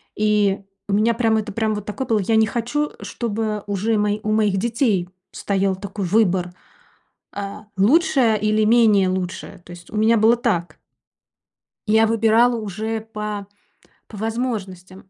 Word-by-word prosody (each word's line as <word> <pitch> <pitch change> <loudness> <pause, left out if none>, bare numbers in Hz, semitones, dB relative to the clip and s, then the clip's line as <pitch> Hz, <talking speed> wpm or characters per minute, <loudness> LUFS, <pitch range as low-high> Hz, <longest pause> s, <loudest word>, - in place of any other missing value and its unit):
И 210 -2 +2 0.3
у 200 - 0
меня 220 +3 +3
прям 225 -1 +1
это 215 -1 -3
прям 220 0 0
вот 205 -1 -6
такое 250 +5 -5
было. 225 -3 +2
Я 215 +3 0
не 220 - +5
хочу, 245 +7 -2
чтобы 215 -2 -3
уже 205 +3 0
у 210 - +1
мо 210 0 +1
у 215 - -1
моих 210 -2 +2
детей 220 -4 0 0.2
стоял 195 -1 -1
такой 200 +1 -5
выбор, 180 -2 +1 0.8
э, 205 - -2 0.4
лучшее 230 - +3
или 215 0 +2
менее 215 -4 +4
лучшее. 185 +1 -5
То - - -14
есть 175 0 -13
у 215 - -7
меня 220 +2 +3
было 225 +2 +4
так. 205 -9 -2 1.1
Я 220 +1 +4
выбирала 225 +2 +3
уже 220 +1 -4
по 210 -2 -6 0.6
по 215 - -11
возможностям. 200 -5 -5
215 Hz, 155 wpm, -21 LUFS, 195-225 Hz, 1.1 s, не